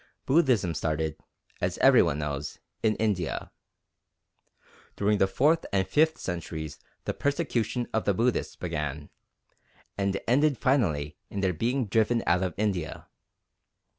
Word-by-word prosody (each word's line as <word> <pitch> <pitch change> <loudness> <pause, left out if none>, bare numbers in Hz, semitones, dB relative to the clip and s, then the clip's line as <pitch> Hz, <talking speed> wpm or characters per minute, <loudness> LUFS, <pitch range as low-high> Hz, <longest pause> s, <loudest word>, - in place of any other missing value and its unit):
Buddhism 130 - +3
started, 80 -1 -1 0.5
as - - -1
every - - +6
one 70 - +1
knows, 75 -1 -4 0.2
in 110 -1 +2
India. 100 -6 -1 1.4
During 105 0 +1
the 95 - +4
fourth 150 +11 +2
and 95 -1 +1
fifth 160 +1 +3
centuries 80 -4 -5 0.3
the - - -1
persecution 130 -5 -1
of 110 - 0
the 100 - +3
Buddhists 120 +4 0
began, 75 -4 -4 0.9
and 100 0 0
ended 140 +2 +3
finally 80 - +1
in 100 - -4
their 95 -2 +1
being 120 - 0
driven 110 +3 +2
out 90 +1 +3
of 90 -3 -2
India. 95 -6 -2
100 Hz, 130 wpm, -28 LUFS, 80-120 Hz, 1.4 s, every